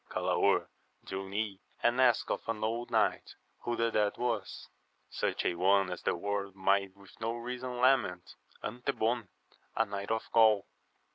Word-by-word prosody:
Galaor - - +2 0.4
drew 95 0 -5
nigh 100 -1 -2 0.2
and 120 +2 +3
asked 120 -4 +3
of - - -1
an 110 -1 -2
old 115 +2 -1
knight - - +1 0.2
who 120 - -2
the 115 0 +1
dead 105 -2 +1
was. 115 -5 -2 0.2
— - - -43
Such - - -1
a - - +2
one 95 +2 +3
as 90 - -5
the - - 0
world 100 +1 -3
might 100 0 +1
with 100 -1 -16
reason 125 +2 -3
lament, 120 -9 +2 0.3
Antebon, 120 -1 -1 0.5
a 115 - +3
knight 100 -1 -5
of 110 0 -1
Gaul. 110 -3 +5
110 Hz, 155 wpm, -31 LUFS, 100-120 Hz, 0.5 s, Gaul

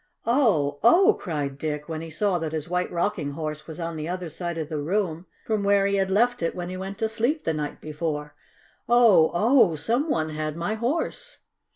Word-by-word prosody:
"Oh! 200 - +2
Oh!" 370 - +6
cried 145 -6 -4
Dick, 150 -1 -3
when 160 -1 -4
he 165 - -7
saw 180 +3 0
that 160 -1 -4
his 155 0 -3
White 180 +1 -1
Rocking 170 -4 -1
Horse 155 0 -5
was 160 +1 -8
on 165 -1 -4
the 155 +1 -4
other 180 -1 -4
side 170 +1 -4
of 160 -2 -3
the 155 -1 -3
room 175 0 -1 0.2
from 215 -2 0
where 200 0 +3
he 200 0 +1
had 190 -1 +1
left 235 +4 +2
it 165 - -1
when 175 -1 -4
he 185 - -5
went 195 +1 -6
to 225 0 0
sleep 240 +8 -1
the 160 - 0
night 150 -1 -4
before. 150 -1 -4 0.6
"Oh! 225 -9 +6
Oh! 210 - +4
Some 235 - -1
one 160 - 0
had 155 0 -4
my 170 +6 -1
Horse!" 310 - -3
175 Hz, 210 wpm, -25 LUFS, 155-215 Hz, 0.6 s, Oh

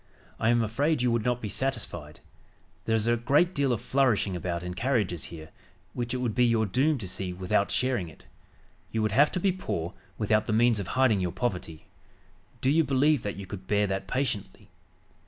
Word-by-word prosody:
I 110 - +2
am 120 -1 +3
afraid 135 +6 0
you 125 - +3
would 115 -2 +1
not 125 0 -1
be - - -1
satisfied. 100 - -3 0.6
There 115 - +2
is 110 -1 +1
a 120 0 +3
great 145 +10 +2
deal 140 -2 +1
of 120 - -1
flourishing 120 -8 +1
about 85 0 -3
in 90 0 -4
carriages 105 - 0
here, 80 -2 -10 0.4
which 120 -1 -3
it 130 - -1
would 125 -3 -1
be 125 - +3
your 115 -2 +3
doom 135 +9 +2
to 105 -6 -6
see 90 0 -3
without 95 +2 0
sharing 120 -9 0
it. 80 - -17 0.7
You 110 -1 0
would 110 - +1
have 145 +8 +4
to 180 - 0
be 190 +1 +2
poor 85 - -4 0.2
without 110 0 +1
the 110 - 0
means 115 0 +3
of 100 - -4
hiding 125 -6 +4
your 90 -2 -1
poverty. 90 -6 -4 0.8
Do 130 - +3
you 160 +2 +4
believe 140 0 +3
that 105 - -4
you 100 - -6
could 95 0 -9
bear 105 0 +2
that 95 -1 -3
patiently? 125 -4 -3
115 Hz, 205 wpm, -28 LUFS, 95-130 Hz, 0.8 s, have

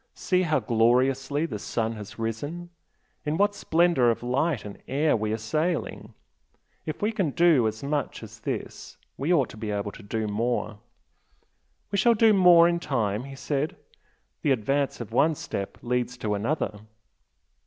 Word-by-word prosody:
See 185 -1 +1
how 155 -5 +2
gloriously 130 +6 +2
the 110 -10 -5
sun 115 +2 -2
has 110 +1 -9
risen! 145 +11 -4 0.5
In 150 +1 -1
what 205 +2 +3
splendour 170 -9 +3
of 115 - -1
light 135 +2 0
and 100 - -9
air 150 +3 +2
we 110 -1 -1
are 110 - 0
sailing! 155 +10 -2 0.7
If 155 +5 -4
we 210 - +2
can 195 -8 0
do 160 -6 +4
as 110 +2 -5
much 145 -1 -2
as - - -11
this - - -6 0.2
we 145 +6 -1
ought 140 -8 +3
to - - -11
be 110 -1 -5
able 105 0 -2
to 115 - -12
do 110 +2 -3
more!" 110 0 -2 1.1
"We 200 - +1
shall 235 +3 +5
do 220 0 +5
more 175 -3 +7
in 170 0 +1
time" 115 -7 -1
he 135 0 -9
said 145 +2 -2 0.7
"The - - 0
advance 135 +2 0
of 110 - -7
one 150 +7 +3
step 100 -7 -5
leads 125 0 -1
to 110 -3 -2
another." 105 0 -2
135 Hz, 165 wpm, -26 LUFS, 110-160 Hz, 1.1 s, more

